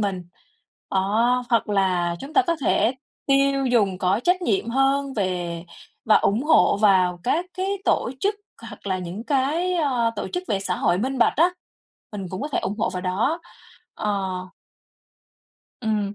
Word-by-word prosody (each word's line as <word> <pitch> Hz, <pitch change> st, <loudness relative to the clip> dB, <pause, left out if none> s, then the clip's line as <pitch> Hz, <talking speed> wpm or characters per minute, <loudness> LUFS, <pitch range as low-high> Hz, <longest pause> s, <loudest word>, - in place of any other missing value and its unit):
mình. 190 Hz, -4 st, -2 dB, 0.7 s
Đó, 225 Hz, +6 st, +2 dB
hoặc 230 Hz, -4 st, +2 dB
là 180 Hz, -4 st, +1 dB
chúng 280 Hz, -, -8 dB
ta 390 Hz, -, +6 dB
có 335 Hz, -1 st, +1 dB
thể 250 Hz, -2 st, +2 dB, 0.3 s
tiêu 275 Hz, 0 st, +3 dB
dùng 205 Hz, -7 st, +2 dB
có 185 Hz, +5 st, +1 dB
trách 360 Hz, +1 st, +2 dB
nhiệm 220 Hz, -, 0 dB
hơn 270 Hz, +1 st, +1 dB
về 175 Hz, -4 st, -2 dB, 0.4 s
và 220 Hz, -, +5 dB
ủng 215 Hz, +5 st, +1 dB
hộ 305 Hz, -, +4 dB
vào 185 Hz, -4 st, +3 dB
các 330 Hz, +8 st, 0 dB
cái 375 Hz, 0 st, -2 dB, 0.2 s
tổ -, -, +1 dB
chức 410 Hz, +1 st, +1 dB, 0.3 s
hoặc -, -, -12 dB
là 190 Hz, -1 st, 0 dB
những 185 Hz, +5 st, -6 dB
cái, 305 Hz, +7 st, 0 dB
ơ, 255 Hz, -8 st, +1 dB
tổ -, -, -3 dB
chức 360 Hz, -1 st, -3 dB
về 195 Hz, -, 0 dB
xã 185 Hz, -2 st, -2 dB
hội 175 Hz, +1 st, +1 dB
minh 260 Hz, +4 st, -2 dB
bạch 235 Hz, -, +3 dB
á, 340 Hz, +4 st, +4 dB, 0.6 s
mình 200 Hz, -2 st, -5 dB
cũng 185 Hz, -, -5 dB
có 290 Hz, -, -3 dB
thể 295 Hz, -, -1 dB
ủng 205 Hz, -, -3 dB
hộ -, -, 0 dB
vào 180 Hz, -, -4 dB
đó, 220 Hz, -, 0 dB, 0.5 s
ờ. 195 Hz, -3 st, -2 dB, 1.5 s
Ừm. 210 Hz, -3 st, -1 dB
220 Hz, 170 wpm, -23 LUFS, 190-275 Hz, 1.5 s, ta